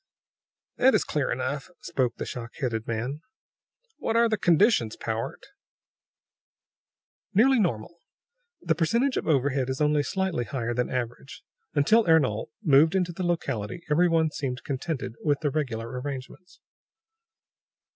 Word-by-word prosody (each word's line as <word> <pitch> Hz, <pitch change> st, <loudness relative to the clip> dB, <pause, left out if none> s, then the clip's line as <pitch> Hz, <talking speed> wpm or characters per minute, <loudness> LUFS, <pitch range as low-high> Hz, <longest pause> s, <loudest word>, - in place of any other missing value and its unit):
"That 265 Hz, +1 st, +5 dB
is -, -, +3 dB
clear 145 Hz, -3 st, -1 dB
enough," 135 Hz, +4 st, -3 dB
spoke 130 Hz, -8 st, -1 dB
the -, -, -5 dB
shock 115 Hz, -1 st, -7 dB
headed 115 Hz, -5 st, -3 dB
man. 125 Hz, +6 st, -3 dB, 0.8 s
"What 225 Hz, -, -1 dB
are 235 Hz, 0 st, +5 dB
the 220 Hz, -, +1 dB
conditions, 175 Hz, -, +3 dB
Powart?" 115 Hz, 0 st, -4 dB, 1.9 s
"Nearly 260 Hz, +5 st, +5 dB
normal. 170 Hz, -, -2 dB, 0.6 s
The -, -, +2 dB
percentage 235 Hz, -, +1 dB
of -, -, -2 dB
overhead 135 Hz, -3 st, +1 dB
is 130 Hz, -, -3 dB
only 150 Hz, 0 st, +3 dB
slightly 180 Hz, -3 st, -1 dB
higher 120 Hz, +1 st, -3 dB
than 125 Hz, +1 st, -1 dB
average. 125 Hz, +2 st, -5 dB, 0.3 s
Until 215 Hz, +11 st, +4 dB
Ernol 140 Hz, -10 st, +3 dB, 0.2 s
moved 155 Hz, +4 st, +5 dB
into 180 Hz, -2 st, +1 dB
the 185 Hz, -, -6 dB
locality 140 Hz, -, -2 dB
every 175 Hz, +4 st, +4 dB
one 160 Hz, -2 st, +2 dB
seemed 130 Hz, -4 st, -4 dB
contented 135 Hz, -2 st, -3 dB
with 145 Hz, -1 st, +1 dB
the 145 Hz, -3 st, 0 dB
regular 120 Hz, -7 st, -2 dB
arrangements." 140 Hz, +6 st, -8 dB
145 Hz, 135 wpm, -26 LUFS, 125-170 Hz, 1.9 s, That